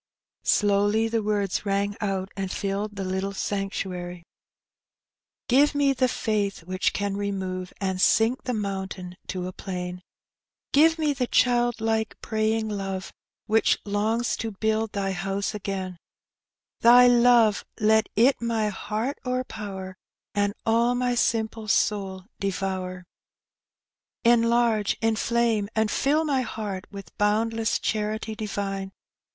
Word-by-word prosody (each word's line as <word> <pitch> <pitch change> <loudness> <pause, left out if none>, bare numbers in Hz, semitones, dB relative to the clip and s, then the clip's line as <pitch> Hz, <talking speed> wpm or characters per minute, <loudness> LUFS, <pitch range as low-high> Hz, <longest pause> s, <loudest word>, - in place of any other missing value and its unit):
Slowly 205 +2 +3
the 225 0 0
words 205 -3 -1
rang 200 0 0
out, 195 -2 -1
and 195 -1 -3
filled 200 +1 -3
the 195 - -3
little 190 +1 -2
sanctuary 185 -3 -3 0.5
— - - -68 0.2
" - - -68
Give 285 +4 +4
me 285 -1 +3
the 255 0 +2
faith 205 -6 -1
which 185 +2 0
can 200 -1 -2
remove 190 -2 -3
And 190 -2 -1
sink 225 +6 +3
the 250 - -1
mountain 190 -3 -4
to 185 -2 -3
a 185 - -5
plain; 180 -1 -5 0.7
Give 320 +3 +5
me 305 -2 +1
the 255 -2 -1
child 240 -1 +2
like 220 -1 -1
praying 220 0 0
love 195 -2 -4 0.3
Which 220 +1 +3
longs 215 +4 0
to 225 - -3
build 220 +1 -1
Thy 195 -1 -1
house 195 +2 -2
again; 190 -3 -4 0.8
Thy 245 +2 +8
love, 240 -3 +5 0.2
let 220 0 +3
it 245 +5 +4
my 225 -2 0
heart 215 +6 -3
overpower, 210 -7 -4 0.4
And 205 0 0
all 235 +2 +3
my 245 0 +1
simple 225 -2 0
soul 195 -3 0 0.2
devour. 185 -2 -3 1.2
"Enlarge, 230 -2 +3
inflame, 225 -1 +1
and 220 -1 +1
fill 300 +3 +2
my 275 -4 +1
heart 210 -5 -5
With 195 -5 -10
boundless 220 +2 +1
charity 215 +1 -2
divine! 195 -2 -4
210 Hz, 130 wpm, -25 LUFS, 195-230 Hz, 1.2 s, Thy